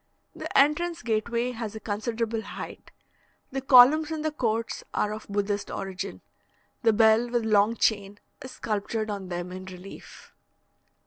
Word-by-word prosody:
The - - -3
entrance 335 +4 +2
gateway 235 +2 0
has 225 -3 -6
a - - -5
considerable 225 +1 -2
height. - - -9 0.6
The 270 0 -3
columns 270 +4 +7
in 315 -1 -3
the 310 - 0
courts 230 -5 -2
are 210 - 0
of 215 - -8
Buddhist 205 0 -1
origin; 195 0 -5 0.6
the 230 - +4
bell 220 +2 +4
with 235 -2 0
long 215 +1 +3
chain 205 -3 0 0.2
is 260 - -8
sculptured 215 0 -2
on 200 -2 -5
them 175 0 -4
in 185 0 -7
relief. 185 +1 -12
220 Hz, 145 wpm, -27 LUFS, 205-245 Hz, 0.6 s, columns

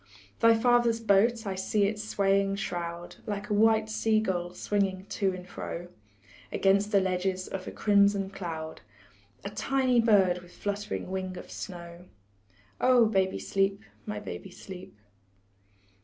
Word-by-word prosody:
Thy 230 0 +6
father's 240 -1 +3
boat, 225 +2 +3
I 195 - -2
see 190 +2 0
its 210 +1 -2
swaying 195 -1 +1
shroud 175 -4 -5
Like 205 0 -4
a - - +3
white 220 +1 +4
sea 220 0 +1
gull, 180 -4 -2
swinging 195 -2 -1
to 195 -2 0
and 185 0 -8
fro 175 -1 -6 0.6
Against 200 +2 +2
the 200 - +5
ledges 185 0 -1
of 190 -1 -6
a - - -4
crimson 200 -1 +3
cloud, 165 -5 -6 0.6
A 200 - -4
tiny 255 +3 +1
bird 195 -6 +4
with 175 0 -16
flutt'ring 205 -1 -3
wing 185 -1 -3
of - - -10
snow. 170 -1 -8 0.7
Oh, 250 -2 +5
baby, 190 -3 +1
sleep, 195 +1 0 0.2
my 210 - -3
baby, 195 - -7
sleep. 180 - -11
200 Hz, 140 wpm, -28 LUFS, 185-215 Hz, 0.7 s, Thy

